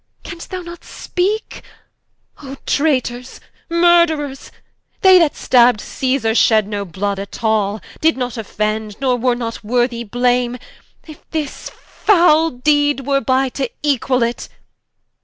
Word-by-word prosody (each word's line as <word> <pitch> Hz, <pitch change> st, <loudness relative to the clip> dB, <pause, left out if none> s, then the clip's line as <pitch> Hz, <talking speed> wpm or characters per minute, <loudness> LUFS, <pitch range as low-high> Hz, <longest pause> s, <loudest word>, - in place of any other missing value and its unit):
Can'st 335 Hz, 0 st, -9 dB
thou 370 Hz, -1 st, -5 dB
not 345 Hz, 0 st, -10 dB
speake? 400 Hz, +4 st, -3 dB, 0.8 s
O 275 Hz, -1 st, -9 dB
Traitors, 255 Hz, -4 st, -1 dB, 0.3 s
Murtherers! 335 Hz, -5 st, +2 dB, 0.5 s
They 375 Hz, -2 st, +7 dB
that 320 Hz, -4 st, +2 dB
stabb'd 245 Hz, -3 st, +4 dB
Cæsar, 255 Hz, -2 st, -1 dB
shed 215 Hz, -3 st, +3 dB
no 205 Hz, -1 st, -4 dB
blood 195 Hz, +3 st, -3 dB
at 200 Hz, +3 st, -8 dB
all: 215 Hz, -1 st, +1 dB, 0.2 s
Did 320 Hz, -3 st, +2 dB
not 250 Hz, -2 st, -3 dB
offend, 215 Hz, -1 st, -3 dB
nor 260 Hz, -2 st, +1 dB
were 245 Hz, 0 st, 0 dB
not 230 Hz, -2 st, -5 dB
worthy 240 Hz, +1 st, 0 dB
Blame, 245 Hz, +2 st, 0 dB, 0.5 s
If 310 Hz, -2 st, -14 dB
this 310 Hz, -3 st, -5 dB
foule 330 Hz, -5 st, +2 dB
deed 290 Hz, +1 st, +1 dB
were 275 Hz, 0 st, +1 dB
by, 265 Hz, 0 st, +1 dB
to 265 Hz, 0 st, -3 dB
equall 265 Hz, -3 st, +1 dB
it. 235 Hz, +1 st, -3 dB
255 Hz, 130 wpm, -18 LUFS, 230-305 Hz, 0.8 s, They